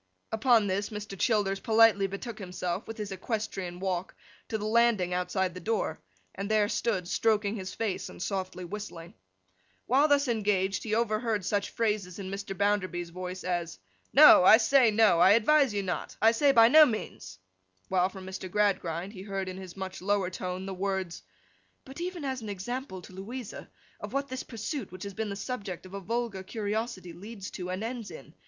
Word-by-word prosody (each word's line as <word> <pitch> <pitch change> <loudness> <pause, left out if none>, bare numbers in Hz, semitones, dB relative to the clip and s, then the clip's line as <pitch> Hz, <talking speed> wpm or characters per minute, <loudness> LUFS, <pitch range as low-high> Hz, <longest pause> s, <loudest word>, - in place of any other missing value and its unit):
Upon 220 -1 +4
this, 200 +1 -1
Mr. 210 -2 -6
Childers 195 -2 +1
politely 220 -2 +4
betook 215 +4 -7
himself, 180 0 -4
with 225 - -7
his 210 -2 -5
equestrian 195 -3 -4
walk, 185 -1 -3 0.3
to 220 - -2
the 210 - -5
landing 215 -5 +3
outside 180 +1 -1
the 180 - -7
door, 205 -4 -2 0.3
and 200 +1 -5
there 215 -1 +3
stood 205 -5 -1
stroking 215 +1 +1
his 190 -3 -6
face, 220 -4 -2
and - - -12
softly 185 -1 -3
whistling. 175 -3 -7 0.7
While 275 +5 +4
thus 285 -1 +3
engaged, 205 -4 0
he 215 -1 -1
overheard 215 -3 0
such 200 0 0
phrases 210 -5 -1
in 195 -2 -6
Mr. 195 -1 -5
Bounderby's 185 -4 0
voice 185 +1 -6
as 175 - -2 0.3
'No. - - +9
I 215 - +9
say 245 +1 +5
no. 215 -5 +4
I 185 +3 +7
advise 270 +4 +4
you 205 -1 -2
not. 180 -2 -4
I 225 +1 +6
say 280 +5 +4
by 230 -3 +7
no 310 +6 +9
means.' 155 - -3 0.5
While, 185 0 +2
from 190 -1 -10
Mr. 190 0 -6
Gradgrind, 190 -2 0
he 185 - -9
heard 195 -1 -4
in 185 0 -6
his 185 -1 -10
much 190 -1 -6
lower 195 -1 0
tone 185 +1 -4
the 195 - -4
words, 190 -2 -3 0.6
'But 270 +5 -9
even 350 -4 -4
as 260 -2 -3
an 215 - -6
example 200 0 -5
to - - -13
Louisa, 220 +5 -7 0.3
of - - -7
what 275 0 -1
this 260 +1 -4
pursuit 250 +5 -5
which 185 0 -8
has 200 -1 -6
been 220 +2 -3
the 200 - -4
subject 200 -5 -5
of 185 - -12
a 200 - -4
vulgar 225 0 -2
curiosity, 210 -2 -4
leads 200 +2 -8
to 180 -1 -6
and 185 +3 -3
ends 230 -1 -5
in. 135 - -11
200 Hz, 190 wpm, -29 LUFS, 185-225 Hz, 0.7 s, No